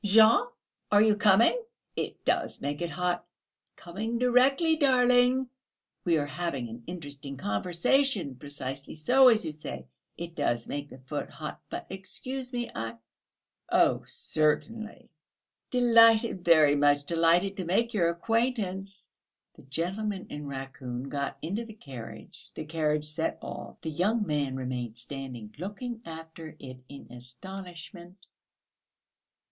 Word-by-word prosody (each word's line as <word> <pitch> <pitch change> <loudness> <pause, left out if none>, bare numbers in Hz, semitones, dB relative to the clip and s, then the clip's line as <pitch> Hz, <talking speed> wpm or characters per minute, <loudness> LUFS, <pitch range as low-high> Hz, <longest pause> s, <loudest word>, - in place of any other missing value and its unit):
"Jean! 220 +4 +6 0.4
Are 205 0 +7
you 215 -1 +4
coming?" 210 - +5 0.3
"It - - -4
does - - 0
make 145 +3 -3
it 170 - -1
hot. 180 0 -1 0.5
Coming 215 +7 -4
directly, 260 +6 +4
darling; 255 -2 +4 0.6
we 170 -2 +4
are 145 - 0
having 145 -5 -3
an 115 +2 -8
interesting 145 -5 -7
conversation! 175 - +1
Precisely 135 +1 -6
so, 255 +13 +6
as 225 -5 +3
you 155 - -3
say, 65 - -7 0.3
it 170 0 -6
does 120 -7 0
make 145 0 -4
the - - -11
foot 130 0 -5
hot.... - - -7
But - - -5
excuse 255 +7 -5
me, 240 -2 -3
I 115 0 -4 0.4
..." - - -31
"Oh, - - +4
certainly." 220 +9 -1 0.6
"Delighted, 230 -5 +5
very 155 -4 +6
much 145 0 +4
delighted 170 +4 +3
to 185 - -3
make 230 +7 +1
your 175 -6 +3
acquaintance!..." 200 -1 -1 0.5
The - - -16
gentleman 185 +8 -2
in 145 0 -6
raccoon 135 -1 -6
got 140 0 -3
into 200 +9 -2
the 220 -2 -11
carriage, 115 - -10
the 155 - -5
carriage 150 -1 0
set 150 +2 -2
off, - - -8
the 160 - -3
young 210 +8 +1
man 145 -5 -1
remained 125 -3 -4
standing 125 -4 -6
looking 225 +6 -5
after 160 -1 -9
it 130 -2 -9
in 140 - -10
astonishment. 175 - -8
170 Hz, 135 wpm, -29 LUFS, 140-220 Hz, 0.6 s, Are